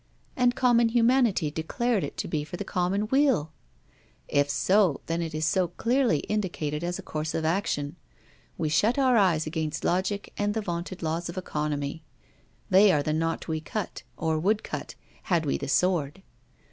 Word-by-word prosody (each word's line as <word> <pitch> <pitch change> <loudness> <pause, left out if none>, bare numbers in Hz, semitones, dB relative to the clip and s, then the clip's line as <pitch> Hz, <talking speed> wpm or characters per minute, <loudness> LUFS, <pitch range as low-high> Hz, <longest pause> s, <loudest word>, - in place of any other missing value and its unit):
And 245 -1 +2
common 240 -2 +4
humanity 230 - +3
declared 205 +8 -1
it - - -6
to - - -3
be 150 -2 -1
for 175 +4 -7
the - - -3
common 190 +3 0
weal! 265 - +2 0.7
If 145 0 +2
so, 185 +3 +2
then 165 +1 -1
it 165 -2 -4
is 155 0 0 0.2
clearly 250 0 +2
indicated 170 -7 -2
as 175 0 -2
a - - -8
course 155 +1 -4
of 160 - -1
action: 160 -3 -1 0.6
we 160 - -1
shut 205 - +2
our 260 -3 +4
eyes 180 -7 +3
against 155 -1 -3
logic 190 +3 -1
and 205 +1 0
the 220 - 0
vaunted 175 -1 -5
laws 165 +2 -2
of 170 - -7
economy. 150 -3 -3 0.6
They 195 +1 +6
are 145 -4 +2
the 155 - -1
knot 165 +1 -1
we 160 -1 -2
cut; 210 +5 -5 0.2
or 160 -1 0
would 205 +6 +1
cut, - - -6 0.3
had 170 -4 +1
we 140 - 0
the 140 - -4
sword. 175 +1 +1
175 Hz, 170 wpm, -27 LUFS, 155-210 Hz, 0.7 s, They